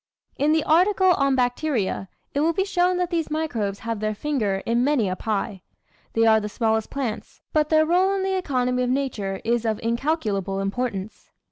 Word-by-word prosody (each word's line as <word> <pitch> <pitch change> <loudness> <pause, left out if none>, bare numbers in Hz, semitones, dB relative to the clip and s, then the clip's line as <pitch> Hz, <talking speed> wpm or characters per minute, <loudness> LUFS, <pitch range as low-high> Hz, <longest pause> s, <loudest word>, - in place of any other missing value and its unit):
In 295 +2 +2
the 315 -1 +2
article 370 +3 +4
on 275 -4 +2
BACTERIA 245 -6 -1 0.2
it 280 - 0
will 325 +3 +2
be 385 +3 0
shown 360 -2 +1
that 360 0 -1
these 335 -2 -1
microbes 240 -11 -2
have 230 -2 -3
their 215 0 -1
finger 210 -8 -1
in 235 +1 +1
many 270 -6 +2
a 185 - -1
pie. 200 -1 -3 0.5
They 225 0 +3
are 220 -1 +6
the 210 0 -4
smallest 220 0 0
plants, 255 -6 -5
but 305 -1 +2
their 315 0 +4
role 365 +4 +3
in 385 - -1
the 385 0 0
economy 250 -8 0
of 250 - 0
nature 230 -8 -2
is 235 0 +1
of 220 -2 -1
incalculable 225 - -1
importance. 200 0 -4
250 Hz, 190 wpm, -24 LUFS, 215-315 Hz, 0.5 s, are